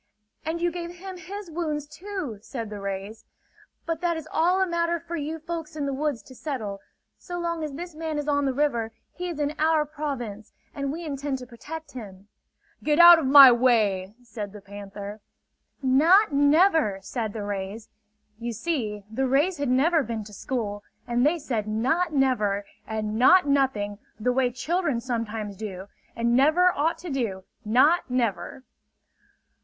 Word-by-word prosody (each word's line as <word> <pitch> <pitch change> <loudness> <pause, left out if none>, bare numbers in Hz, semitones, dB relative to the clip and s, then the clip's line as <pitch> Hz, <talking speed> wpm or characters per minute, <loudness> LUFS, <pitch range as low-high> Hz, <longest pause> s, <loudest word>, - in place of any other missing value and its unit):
"And 320 +2 -2
you 345 0 +1
gave 345 0 -6
him 375 +1 -8
his 370 +2 -8
wounds, 305 -3 -2
too," 310 - -6
said 230 -2 -6
the 205 - -6
rays. 200 +2 -5 0.6
"But 330 -1 -3
that 345 -2 0
is 320 - -7
all 360 +3 +3
a 380 - +3
matter 340 -1 0
for 340 - -6
you 310 +1 -3
folks 325 -1 -6
in 295 -2 -2
the 275 - -2
woods 275 -5 -2
to 260 - -14
settle. 235 -8 -5 0.4
So 355 -1 -6
long 335 -2 -2
as 300 -2 -4
this 345 +4 -7
man 315 -1 -4
is 295 0 -3
on 285 -1 +2
the 270 - +2
river, 250 -5 0 0.2
he 360 0 -5
is 330 -3 -5
in 290 0 0
our 310 -1 +3
province 270 -8 -5 0.2
and 280 -1 -3
we 335 +3 -6
intend 280 -2 -3
to 255 - -9
protect 290 +6 -9
him!" 205 -5 -10 0.5
"Get 300 0 +2
out 345 0 +10
of 290 - -1
my 275 -1 +10
way!" 215 -6 +2
said 215 -4 -7
the 210 - -9
panther. 205 +1 -9 0.6
"Not 320 +9 +5
never!" 295 - +4
said 220 +1 -3
the 215 - -4
rays. 205 +2 -5 0.5
You 235 0 -4
see, 220 -6 -3
the 260 +5 -1
rays 295 +8 +2
had 285 -2 -1
never 310 +6 +3
been 230 -4 -4
to 210 0 -12
school; 205 -3 -4 0.2
and 240 +1 +1
they 305 +5 +3
said 230 -8 -3
"not 260 +12 +1
never" 215 -8 +1 0.2
and 215 0 -3
"not 360 +6 +6
nothing" 235 -8 +1 0.2
the 250 +3 +1
way 255 -1 +2
children 295 +2 -1
sometimes 225 -4 -3
do 195 -1 -7 0.3
and 235 +1 +1
never 320 +7 +5
ought 315 +4 0
to 350 -3 -7
do, 220 -8 -2 0.2
not 260 +10 +3
never! 235 -2 -2
270 Hz, 175 wpm, -26 LUFS, 220-320 Hz, 0.6 s, out